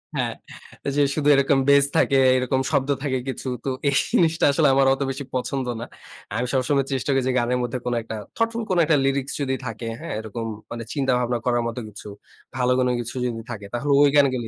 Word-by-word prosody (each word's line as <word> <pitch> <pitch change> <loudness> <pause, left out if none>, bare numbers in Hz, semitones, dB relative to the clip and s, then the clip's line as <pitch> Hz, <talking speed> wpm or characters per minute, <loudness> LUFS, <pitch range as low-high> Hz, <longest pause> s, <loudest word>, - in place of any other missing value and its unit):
হ্যাঁ, - - -1 0.5
ওইযে 140 +1 +1
শুধু 150 -2 0
এরকম 135 0 +3
bass 140 0 +6
থাকে, 135 - +3 0.2
এরকম 130 +1 0
শব্দ 140 -1 +1
থাকে 130 -2 0
কিছু। 130 0 -5 0.2
তো 135 - -2 0.2
এই 140 - 0 0.2
জিনিসটা 165 -1 +3
আসলে 150 +1 +3
আমার 135 0 +4
অত 135 - -4
বেশি 135 +1 -4
পছন্দ 130 +1 -2 0.2
না। - - -4 0.5
আমি 125 +2 -1
সবসময় 135 +1 +1
চেষ্টা 135 +1 -2
করি 135 - +1
যে, 130 - +2
গানের 120 +1 0
মধ্যে 120 +1 -2
কোন 125 - -1
একটা 110 - -6 0.2
thoughtful 230 0 -1
কোন 185 - +1
একটা 150 -1 +3
lyrics 135 0 0
যদি 135 -1 0
থাকে, 115 0 -5
হ্যাঁ - - -6
এরকম 110 +1 -5 0.3
মানে 115 0 -5
চিন্তা-ভাবনা 125 -4 +1
করার 120 -1 +1
মতো 115 +1 -4
কিছু, 105 0 -11 0.5
ভালো 125 -1 +1
কোনো 125 -1 +2
কিছু 120 +2 -5
যদি 115 -2 -3
থাকে, 105 -3 -7
তাহলে 140 +4 -1
ঐ - - +7
গানগুলো 130 -5 +3
130 Hz, 205 wpm, -23 LUFS, 120-140 Hz, 0.5 s, ঐ